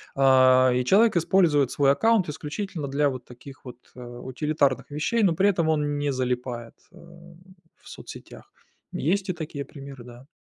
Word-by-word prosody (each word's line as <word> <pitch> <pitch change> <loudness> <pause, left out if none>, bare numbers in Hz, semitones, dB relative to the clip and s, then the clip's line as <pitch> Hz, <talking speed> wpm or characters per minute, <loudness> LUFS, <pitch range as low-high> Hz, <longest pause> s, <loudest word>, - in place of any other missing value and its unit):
А, 130 -1 +5
и 125 - 0
человек 205 - +4
использует 165 -6 +2
свой 140 -1 +3
аккаунт 220 +2 +2
исключительно 155 +1 -5
для 140 +1 +1
вот 130 -2 -7
таких 130 +2 -14
вот, 125 -1 -10 0.2
э, - - -12
утилитарных 130 +3 -2
вещей, 210 +10 -1
но 180 - +3
при 195 +5 +2
этом 170 -5 0
он 150 -2 0
не 145 0 -1
залипает, 125 -2 -4 0.2
а, - - -21 0.9
в - - -15
соцсетях. - - -12 0.4
Есть 190 +5 -1
и - - 0
такие 150 -4 -6
примеры, 135 -3 -11
да. 125 +2 -14
140 Hz, 160 wpm, -25 LUFS, 130-165 Hz, 0.9 s, А